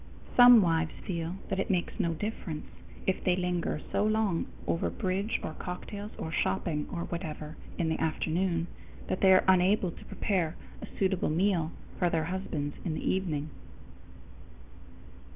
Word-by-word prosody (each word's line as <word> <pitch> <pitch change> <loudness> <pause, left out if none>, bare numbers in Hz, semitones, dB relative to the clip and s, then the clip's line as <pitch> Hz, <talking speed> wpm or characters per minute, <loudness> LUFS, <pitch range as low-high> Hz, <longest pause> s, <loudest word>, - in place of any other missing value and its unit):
_ - - -16
Some 245 -3 +9
wives 165 -2 +1
feel 170 -1 -3
that 195 - -1
it - - -1
makes 180 +3 0
no 170 -5 +1
difference 175 -4 -4 0.4
if 190 - 0
they 180 - +3
linger 180 -3 -1
so - - +2
long 215 -5 +1 0.2
over 165 - 0
bridge 195 +1 -1
or 155 - -3
cocktails 200 +5 -6
or 160 - -4
shopping 150 - 0
or 170 - -3
whatever 155 -3 -5 0.2
in 165 -2 +1
the 160 - -1
afternoon 165 +2 0 0.4
that - - -1
they 190 - +7
are 185 - +7
unable 185 0 +4
to - - -13
prepare 175 -5 -1 0.3
a - - -6
suitable 190 -2 +1
meal 170 0 +2 0.3
for 175 - +3
their 165 -2 +1
husbands 160 -4 -3
in 160 -3 -2
the - - -3
evening. 155 -6 -1
180 Hz, 155 wpm, -30 LUFS, 160-190 Hz, 0.4 s, Some